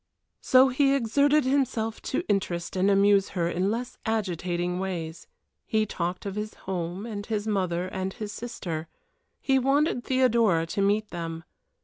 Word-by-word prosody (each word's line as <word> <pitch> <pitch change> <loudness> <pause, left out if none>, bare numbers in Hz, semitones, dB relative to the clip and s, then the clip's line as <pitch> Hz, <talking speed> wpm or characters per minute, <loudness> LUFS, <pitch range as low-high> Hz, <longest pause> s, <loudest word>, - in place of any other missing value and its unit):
So 260 +1 +6
he 275 +2 +3
exerted 280 +4 +3
himself 255 -5 0
to - - -1
interest 190 -4 -1
and 190 +2 +3
amuse 200 0 +4
her 170 -1 +1
in 180 +3 0
less 240 +3 -4
agitating 180 -5 -1
ways. 170 -4 -4 0.4
He 220 -2 +2
talked 180 -2 -3
of 200 - -3
his 210 +1 -5
home 180 +1 -3
and 210 -3 -5
his 215 -2 -2
mother 185 -4 0
and 190 0 -3
his 210 +1 -6
sister. 175 -9 -5 0.5
He 270 -1 +2
wanted 275 0 +2
Theodora 230 -10 +3
to 180 +4 -2
meet 205 +2 +1
them. 165 -1 -5
205 Hz, 150 wpm, -27 LUFS, 180-235 Hz, 0.5 s, So